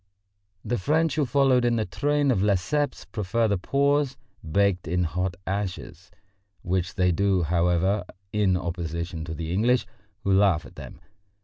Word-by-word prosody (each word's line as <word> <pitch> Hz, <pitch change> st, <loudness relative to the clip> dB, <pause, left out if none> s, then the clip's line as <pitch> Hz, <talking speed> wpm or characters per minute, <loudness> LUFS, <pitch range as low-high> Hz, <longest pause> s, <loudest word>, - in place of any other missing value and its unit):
The 120 Hz, +1 st, -1 dB
French 155 Hz, -, +1 dB
who 150 Hz, -2 st, 0 dB
followed 135 Hz, -2 st, +3 dB
in 120 Hz, -1 st, +2 dB
the 110 Hz, -2 st, 0 dB
train 145 Hz, +9 st, +1 dB
of 105 Hz, -7 st, +1 dB
Lesseps 105 Hz, +9 st, 0 dB
prefer 110 Hz, +2 st, -1 dB
the 100 Hz, -3 st, 0 dB
paws 140 Hz, +4 st, +1 dB, 0.2 s
baked 90 Hz, +2 st, +1 dB
in 90 Hz, +2 st, 0 dB
hot 90 Hz, +2 st, -2 dB
ashes, 95 Hz, -2 st, -4 dB, 0.5 s
which 90 Hz, 0 st, -1 dB
they 90 Hz, -2 st, +3 dB
do, 95 Hz, 0 st, +1 dB
however, 90 Hz, +4 st, +1 dB, 0.3 s
in 100 Hz, -3 st, +2 dB
opposition 85 Hz, -2 st, -4 dB
to 80 Hz, -1 st, -5 dB
the 80 Hz, +2 st, -4 dB
English, 120 Hz, +6 st, +2 dB, 0.4 s
who 100 Hz, -, +2 dB
laugh 95 Hz, -5 st, +3 dB
at -, -, -13 dB
them. -, -, -10 dB
95 Hz, 150 wpm, -25 LUFS, 90-120 Hz, 0.5 s, followed